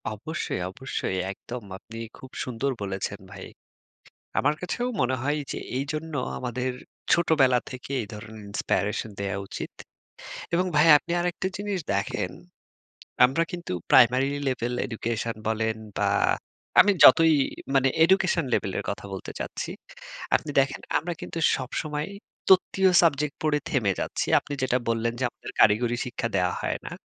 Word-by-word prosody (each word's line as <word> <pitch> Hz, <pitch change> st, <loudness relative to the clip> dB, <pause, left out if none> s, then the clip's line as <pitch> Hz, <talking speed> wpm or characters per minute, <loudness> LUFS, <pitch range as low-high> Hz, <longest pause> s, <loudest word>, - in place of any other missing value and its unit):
অবশ্যই, 110 Hz, -, -4 dB
অবশ্যই, 115 Hz, -4 st, -3 dB
একদম 120 Hz, +4 st, -8 dB
আপনি 115 Hz, +3 st, -11 dB, 0.2 s
খুব 130 Hz, -, -12 dB
সুন্দর 130 Hz, +2 st, -2 dB
বলেছেন 100 Hz, 0 st, -3 dB
ভাই। 95 Hz, -1 st, -8 dB, 0.9 s
আমার 150 Hz, -, +3 dB
কাছেও 210 Hz, +8 st, -2 dB
মনে 130 Hz, +1 st, +2 dB
হয় 145 Hz, +3 st, 0 dB
যে -, -, -4 dB, 0.2 s
এইজন্য 155 Hz, +4 st, -4 dB, 0.2 s
আমাদের 125 Hz, +1 st, -2 dB, 0.4 s
ছোটবেলা 145 Hz, -7 st, +4 dB
থেকে 130 Hz, +1 st, -8 dB
এই 110 Hz, -, -6 dB
ধরনের 110 Hz, 0 st, -9 dB
Inspiration 100 Hz, +1 st, -1 dB
দেয়া 100 Hz, 0 st, -2 dB
উচিত। -, -, -6 dB, 0.8 s
এবং 180 Hz, +2 st, +2 dB
ভাই 150 Hz, +2 st, +6 dB
আপনি 170 Hz, +3 st, -3 dB
আরেকটা 175 Hz, +1 st, -1 dB
জিনিস 205 Hz, -1 st, -2 dB, 0.2 s
দেখেন। 95 Hz, -2 st, -1 dB, 0.9 s
আমরা 135 Hz, +6 st, +3 dB
কিন্তু 175 Hz, -, -5 dB, 0.2 s
প্রাইমারি 130 Hz, +2 st, +6 dB, 0.2 s
লেভেল 125 Hz, -1 st, -1 dB
এডুকেশন 115 Hz, -1 st, -3 dB
বলেন 110 Hz, 0 st, 0 dB, 0.2 s
বা 100 Hz, 0 st, +2 dB, 0.7 s
আমি 205 Hz, +2 st, +6 dB
যতই 165 Hz, -1 st, +8 dB, 0.4 s
মানে 135 Hz, 0 st, +4 dB, 0.2 s
এডুকেশন 190 Hz, -, +3 dB
লেভেলের -, -, 0 dB
কথা -, -, -5 dB
বলতে -, -, -6 dB
চাচ্ছি, -, -, -4 dB, 0.6 s
আপনি 155 Hz, -, 0 dB
দেখেন 135 Hz, 0 st, -1 dB, 0.2 s
আমরা 175 Hz, +3 st, -4 dB
কিন্তু -, -, -6 dB, 0.2 s
সবসময় 150 Hz, +3 st, -3 dB, 0.4 s
তত্ত্বীয় 190 Hz, 0 st, +5 dB
সাবজেক্ট 150 Hz, -3 st, +2 dB
পড়ে 155 Hz, -1 st, +2 dB
থেমে 110 Hz, -7 st, +2 dB
যাচ্ছি। -, -, -2 dB
আপনি -, -, -8 dB
যেটা 125 Hz, -1 st, +2 dB
বললেন 115 Hz, 0 st, +1 dB
যে -, -, +1 dB
আমাদের -, -, -10 dB
কারিগরি 115 Hz, +3 st, +4 dB
শিক্ষা 120 Hz, -1 st, -3 dB
দেয়া 90 Hz, -1 st, +2 dB
হয় -, -, -1 dB
না। -, -, -6 dB
130 Hz, 140 wpm, -26 LUFS, 110-155 Hz, 0.9 s, যতই